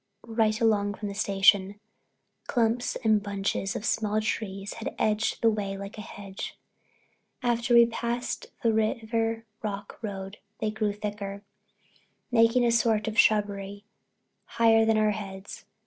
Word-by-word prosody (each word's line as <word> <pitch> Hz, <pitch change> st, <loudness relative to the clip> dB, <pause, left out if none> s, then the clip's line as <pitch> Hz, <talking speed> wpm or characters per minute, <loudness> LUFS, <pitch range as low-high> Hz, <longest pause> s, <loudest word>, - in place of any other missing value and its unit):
Right 220 Hz, -1 st, +1 dB
along 205 Hz, -3 st, +2 dB
from 205 Hz, -1 st, -5 dB
the -, -, -5 dB
station, 200 Hz, 0 st, +3 dB, 0.7 s
clumps 235 Hz, -1 st, +1 dB
and 215 Hz, -2 st, +4 dB
bunches 195 Hz, -1 st, -2 dB
of 205 Hz, -, -4 dB
small 215 Hz, -1 st, +1 dB
trees 200 Hz, -2 st, -3 dB
had 230 Hz, -, -6 dB
edged 215 Hz, +2 st, 0 dB
the 230 Hz, -, +6 dB
way 200 Hz, -2 st, -3 dB
like 200 Hz, +2 st, -7 dB
a 215 Hz, -, -7 dB
hedge. 200 Hz, -2 st, -8 dB, 0.9 s
After 240 Hz, 0 st, +2 dB
we 235 Hz, 0 st, +9 dB
passed 235 Hz, +1 st, -3 dB, 0.2 s
the 230 Hz, -1 st, +3 dB
Riven 225 Hz, +1 st, 0 dB, 0.2 s
Rock 205 Hz, -2 st, -5 dB
Road 195 Hz, -2 st, -6 dB, 0.2 s
they 215 Hz, -1 st, -1 dB
grew 215 Hz, -1 st, -1 dB
thicker, 205 Hz, -1 st, -5 dB, 0.9 s
making 230 Hz, +1 st, +4 dB
a 235 Hz, -, +3 dB
sort 225 Hz, -2 st, +2 dB
of 220 Hz, 0 st, 0 dB
shrubbery 205 Hz, -1 st, +2 dB, 0.6 s
higher 225 Hz, -1 st, +4 dB
than 225 Hz, 0 st, +3 dB
our 215 Hz, 0 st, +3 dB
heads. 195 Hz, -1 st, -7 dB
215 Hz, 140 wpm, -27 LUFS, 200-225 Hz, 0.9 s, we